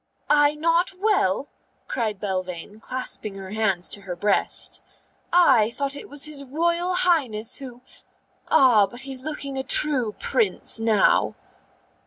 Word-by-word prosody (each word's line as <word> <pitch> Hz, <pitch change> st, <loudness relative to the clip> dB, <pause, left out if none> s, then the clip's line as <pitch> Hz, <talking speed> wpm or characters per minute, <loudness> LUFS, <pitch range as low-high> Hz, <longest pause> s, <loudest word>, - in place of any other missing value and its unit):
"I 295 Hz, 0 st, +4 dB
not 335 Hz, +4 st, +1 dB
well?" 375 Hz, -, +1 dB, 0.4 s
cried 215 Hz, -5 st, -2 dB
Belvane, 185 Hz, 0 st, -4 dB
clasping 225 Hz, -4 st, -4 dB
her 190 Hz, -1 st, -8 dB
hands 200 Hz, -5 st, 0 dB
to 200 Hz, -, -1 dB
her 185 Hz, -2 st, -6 dB
breast. 200 Hz, +3 st, -1 dB, 0.5 s
"I 265 Hz, -12 st, +5 dB
thought 280 Hz, +3 st, -3 dB
it -, -, -9 dB
was 290 Hz, 0 st, -3 dB
his 300 Hz, -2 st, -7 dB
Royal 340 Hz, +6 st, 0 dB
Highness 255 Hz, -12 st, +1 dB
who 250 Hz, -3 st, -10 dB, 0.7 s
Ah, 230 Hz, -7 st, +5 dB
but 240 Hz, +6 st, -7 dB
he's 265 Hz, -1 st, -5 dB
looking 280 Hz, -2 st, -4 dB
a -, -, -2 dB
true 260 Hz, -5 st, 0 dB
Prince 435 Hz, -, 0 dB
now." 220 Hz, -3 st, +3 dB
255 Hz, 135 wpm, -24 LUFS, 210-300 Hz, 0.7 s, I